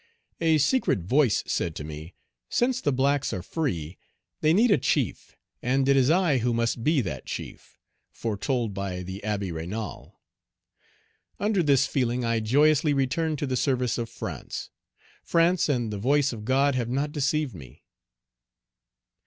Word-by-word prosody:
A 160 -1 +3
secret 155 - +2
voice 125 - +2
said 85 -2 -2
to - - -5
me, 80 +3 -8 0.3
'Since 255 +1 +1
the 145 - +1
blacks 140 +2 +1
are 90 - -4
free, 90 - -3 0.4
they 155 - +3
need 220 +7 +4
a 175 - +4
chief, - - -1 0.2
and 135 +2 +1
it 140 - +5
is 135 0 +4
I 165 -5 +3
who 120 0 0
must 115 0 -1
be 155 -1 +3
that 75 - -5
chief, - - -8 0.3
foretold 115 +1 -2
by 95 -2 -4
the 95 +2 -7
Abbé 100 -4 -2
Raynal.' 95 +7 -6 1.3
Under 205 -2 +1
this 140 -5 +3
feeling 125 -2 -1
I 115 -1 +1
joyously 145 +6 +3
returned 150 +4 0
to 145 - -2
the 130 -2 -2
service 125 -2 0
of 115 -1 -3
France. 120 - -6 0.5
France 170 0 +2
and 120 -6 0
the 100 - -4
voice 135 +4 +2
of 105 -2 -8
God 135 +3 +3
have 120 -2 -1
not 140 +4 -1
deceived 150 -2 0
me." 70 -6 -13
130 Hz, 155 wpm, -26 LUFS, 105-150 Hz, 1.3 s, it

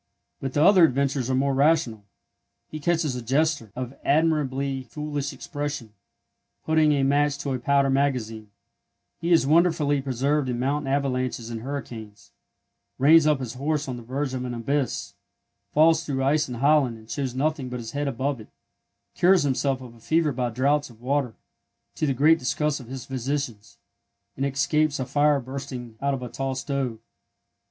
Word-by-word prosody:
But 135 -1 -4
the 145 - +3
other 185 0 +7
adventures 135 -3 +2
are 130 - +1
more 135 +1 +1
rational. 135 -7 +2 0.6
He 155 - -6
catches 160 -3 0
a 125 - -4
jester—of 130 -2 -1
admirably 140 -3 +1
foolish 145 +2 -4
expression—putting 145 +3 -3
a 140 -2 +1
match 145 +1 +2
to 140 -1 -3
a 130 - -2
powder 140 +2 +2
magazine; 120 -6 -1 0.7
he 170 +1 -2
is 165 -5 +5
wonderfully 150 -2 +3
preserved 135 +2 0
in 120 - -1
mountain 135 +2 -1
avalanches 130 -4 -1
and 115 -1 -5
hurricanes; 110 -6 -7 0.7
reins 155 +3 +6
up 150 -1 +4
his 125 -3 -5
horse 145 +3 -2
on 125 -2 -4
the - - -8
verge 130 +3 -3
of 130 -1 -3
an 125 -1 -4
abyss; 135 +3 -2 0.6
falls 160 +4 +4
through 135 -4 -2
ice 145 +1 +2
in 125 - -4
Holland 135 -2 +3
and 110 0 -16
shows 130 0 -3
nothing 145 -1 -1
but 125 - -4
his 115 -1 -7
head 145 0 -2
above 135 +1 -2
it; 105 - -13 0.7
cures 180 -1 +4
himself 135 -1 0
of 125 -2 -10
a 115 - -18
fever 160 +5 +1
by 125 -2 -1
draughts 140 +5 +1
of 115 -2 -17
water, 130 -1 -1 0.6
to 155 - -1
the 135 - 0
great 155 +5 +5
disgust 145 +3 -1
of 125 - -11
his 130 0 -7
physicians, 130 -4 -4 0.6
and 135 +1 -1
escapes 145 +2 +1
a 130 - -1
fire 145 +2 +2
bursting 130 -3 -7
out 140 0 +1
of 125 - -7
a - - -4
tall 135 +1 -3
stove. 135 -3 -2
135 Hz, 170 wpm, -25 LUFS, 125-145 Hz, 0.7 s, other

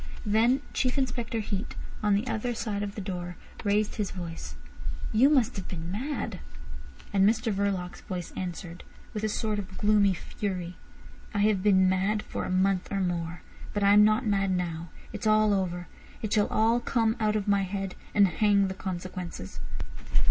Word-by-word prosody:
Then 230 +6 +4
Chief 255 0 +1
Inspector 240 -3 -1
Heat, 200 +2 -3 0.3
on 210 -2 +3
the 205 +4 0
other 240 0 -1
side 210 -3 -2
of 205 -1 -4
the 210 - -4
door, 180 -2 -4 0.3
raised 210 +1 +1
his 210 -3 0
voice. 165 - -6 0.6
"You 245 +6 +6
must 265 -9 +3
have 190 - -5
been 170 -1 -5
mad." 270 +9 -3 0.7
And 195 -1 +4
Mr 225 0 0
Verloc's 195 -3 -1
voice 180 -3 -5
answered, 175 -1 -5 0.3
with 210 - -3
a 215 - +1
sort 210 0 -1
of 190 -2 -7
gloomy 205 -2 +4
fury: 180 -1 -4 0.6
"I 205 - +2
have 210 -2 +3
been 190 -2 +5
mad 195 +3 +1
for - - -4
a - - -4
month 185 0 +2
or 200 - 0
more, 175 -2 -2 0.3
but 205 - +1
I 200 0 +6
am 210 0 +8
not 215 +4 +4
mad 195 -2 +2
now. 170 -2 -2 0.2
It's 210 +1 -2
all 215 -1 +5
over. 180 -2 -1 0.4
It 215 - -1
shall 210 -2 +4
all 225 +2 +3
come 230 -2 +1
out 215 -1 +2
of 210 -1 -1
my 200 -1 +4
head, 195 0 -3 0.2
and 200 -2 +7
hang 200 +1 +3
the - - -2
consequences." 180 - -5
200 Hz, 175 wpm, -28 LUFS, 185-215 Hz, 0.7 s, am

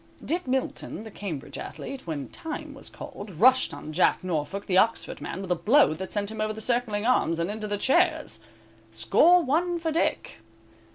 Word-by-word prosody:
Dick 345 -2 -1
Milton, 255 -4 -2
the 220 - -10
Cambridge 175 -10 -6
athlete, 270 -8 -7
when 145 -5 -4
"time" 310 -2 -6
was 275 - -7
called, 205 - -9
rushed 250 +9 +4
on 155 - -8
Jack 180 +3 +3
Norfolk, 180 +3 -3
the 185 - 0
Oxford 225 +4 +2
man, 190 - -5
with 185 - -5
a - - +4
blow 215 - +4
that 190 +4 -6
sent 205 0 -1
him 220 -1 -5
over 215 0 0
the 220 - -8
circling 225 -2 0
arms 235 -9 +2
and 170 +4 -1
into 215 0 -4
the 205 0 -1
chairs. 315 - +1 0.5
Score 305 - +4
one 345 +5 +1
for 325 -1 -2
Dick. 310 - -1
215 Hz, 185 wpm, -26 LUFS, 185-275 Hz, 0.5 s, rushed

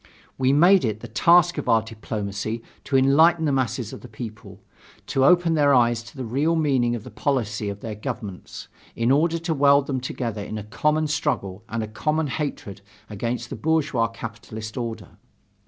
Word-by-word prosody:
We 130 0 +2
made 175 +7 +5
it 110 -2 -2
the 120 - -7
task 170 - +4
of - - -4
our 115 -2 +4
diplomacy 110 0 -5 0.2
to 135 - +2
enlighten 160 +5 +4
the 145 - +1
masses 125 -4 -1
of - - -9
the - - -10
peoples, 110 -1 -9 0.5
to 135 - 0
open 175 +3 +4
their 145 -3 +4
eyes 120 -2 +3
to 120 - -14
the 130 - -4
real 145 +8 +1
meaning 130 -7 +1
of 115 - -6
the - - -11
policy 110 -7 -1
of 100 0 -7
their 110 - -5
governments, 105 -2 -7 0.3
in 115 +2 +1
order 165 +4 +3
to 165 0 -2
weld 140 -1 +4
them 130 -3 -2
together 115 -4 -4
in 110 - -6
a 105 - -5
common 150 +8 0
struggle 105 -10 -2
and 115 0 -2
a - - -4
common 150 +9 -1
hatred 130 -8 -4 0.3
against 120 +3 -3
the - - -3
bourgeois 150 -7 +1
capitalist 110 -1 -8
order. 115 -3 -6
125 Hz, 185 wpm, -24 LUFS, 110-150 Hz, 0.5 s, made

